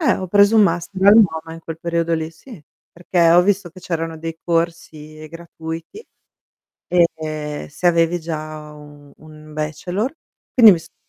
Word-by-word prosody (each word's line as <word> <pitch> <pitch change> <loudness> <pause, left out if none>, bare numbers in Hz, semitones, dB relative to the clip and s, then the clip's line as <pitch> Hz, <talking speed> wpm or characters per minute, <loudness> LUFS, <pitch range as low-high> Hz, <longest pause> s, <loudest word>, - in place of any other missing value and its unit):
Eh, 290 - +2
ho 185 - -5
preso 205 +4 +4
un 215 - +7
master 185 +2 0
al 205 - +9
MOMA 160 -7 +2
in 165 - -11
quel 165 0 -8
periodo 170 0 -1
lì, 160 0 -3
sì, 210 - -14 0.3
perché 170 -1 +1
ho 175 +1 +6
visto 195 -2 0
che 185 - -15
c'erano 165 -2 -4
dei 165 0 -6
corsi 160 -2 -3
gratuiti 165 - -9 0.9
e 155 -4 -1
se 175 +4 -1
avevi 170 0 +2
già 155 -1 -7
u 145 -1 -15
un 155 0 -15
bachelor, 175 - -3 0.4
quindi 225 -6 +8
mi 165 - -2
sono - - -17
165 Hz, 160 wpm, -19 LUFS, 155-180 Hz, 0.9 s, al